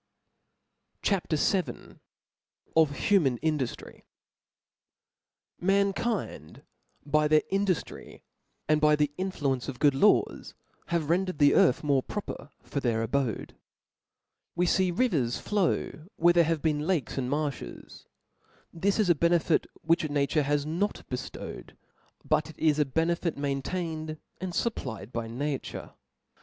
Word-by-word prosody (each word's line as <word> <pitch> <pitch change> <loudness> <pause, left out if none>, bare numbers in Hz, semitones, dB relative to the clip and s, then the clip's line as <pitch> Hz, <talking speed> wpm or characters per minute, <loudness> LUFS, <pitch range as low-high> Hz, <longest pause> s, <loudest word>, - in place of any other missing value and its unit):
CHAP. 195 -5 0
VIL 180 +4 -1 0.8
Of 155 -3 +4
human 155 -12 +3
Indujiry. 150 -6 -2 1.6
MAnkind 195 - -1 0.4
by 150 +1 +2
their 155 0 +4
induftry, 195 -3 -2 0.4
and 155 0 +3
by 150 0 +5
the 150 -1 +1
influ 185 -8 0
ence 125 -2 -5
of 130 - -6
good 145 +2 +4
laws, 205 +10 +2 0.3
have 165 -2 0
rendered 185 -1 0
the 145 -1 +5
earth 130 - +4
more 140 -3 +3
proper 145 -5 -6
for 140 - -3
their 115 -4 0
abode. 125 -2 -2 1.0
We 175 +1 +2
fee 185 +1 +2
rivers 170 - +1
flow 180 -5 -1
where 175 +1 +4
there 170 -1 +5
have 165 -1 -1
been 150 -1 0
lakes 170 -7 0
and 125 -1 -2
marflies: 145 - -4 0.7
this 195 +5 0
is 215 - +3
a - - +7
benefit 170 +1 +2 0.2
which 165 -1 +2
nature 145 +2 +1
has 145 0 0
not 175 +7 -2
beftowed; 125 - -7 0.5
but 155 - +1
it 160 - -12
is 155 -2 +2
a 150 - +4
benefit 165 +3 0
maintained 155 +3 -3 0.2
and 185 0 -4
fupplied 125 - -3
by 115 -2 -3
nature. 135 +4 -4
155 Hz, 125 wpm, -28 LUFS, 140-175 Hz, 1.6 s, a